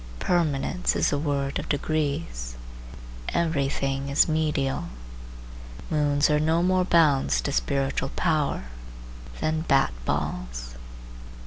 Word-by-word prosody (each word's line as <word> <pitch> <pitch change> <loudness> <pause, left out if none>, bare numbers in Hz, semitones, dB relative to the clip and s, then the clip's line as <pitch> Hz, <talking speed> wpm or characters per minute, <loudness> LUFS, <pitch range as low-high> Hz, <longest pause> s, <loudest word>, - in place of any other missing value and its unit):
Permanence 135 - 0
is - - +2
a 145 - +1
word 140 -2 -1
of - - -7
degrees. 145 - -2 0.7
Every 160 -5 +1
thing 135 0 -2
is 140 - +4
medial. 150 - 0 1.1
Moons 145 -1 +2
are 150 0 +2
no 160 +3 +2
more 185 0 +3
bounds 140 - +3
to - - -2
spiritual 135 - 0
power 155 - 0 0.8
than 155 0 0
bat 135 - +2
balls. - - -3
145 Hz, 110 wpm, -26 LUFS, 135-155 Hz, 1.1 s, is